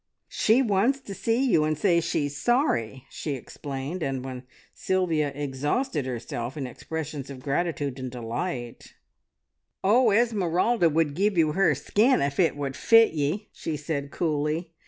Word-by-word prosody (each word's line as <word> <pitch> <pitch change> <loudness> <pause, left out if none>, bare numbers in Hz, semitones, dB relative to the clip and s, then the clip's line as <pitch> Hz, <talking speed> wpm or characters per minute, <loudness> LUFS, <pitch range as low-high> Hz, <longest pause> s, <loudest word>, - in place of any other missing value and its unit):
"She 235 +5 +3
wants 230 +5 +2
to 205 - -8
see 230 +6 0
you, 165 -12 +3
and 155 0 0
say 170 0 +3
she's 145 -3 -1
sorry," 145 - 0
she 150 - -4
explained, 140 +6 -6
and 135 -3 -2
when 130 -1 -7 0.3
Sylvia 170 -6 0
exhausted 145 - -1
herself 120 +1 -5
in 140 - -3
expressions 145 +2 -6
of 135 -2 -8
gratitude 145 -2 -1
and 130 -1 -4
delight, 120 +2 -5 0.9
"Oh, 230 +5 +5
Esmeralda 205 -3 +2
would 155 -1 +1
give 200 +4 +1
you 155 -2 +4
her 165 -3 +3
skin 215 - +2
if 140 0 -1
it 165 -5 +3
would 140 -2 -3
fit 225 -4 +5
ye!" 155 +8 -2
she 155 -2 -4
said 145 -1 -3
coolly. 155 +2 -2
155 Hz, 150 wpm, -26 LUFS, 140-195 Hz, 0.9 s, Oh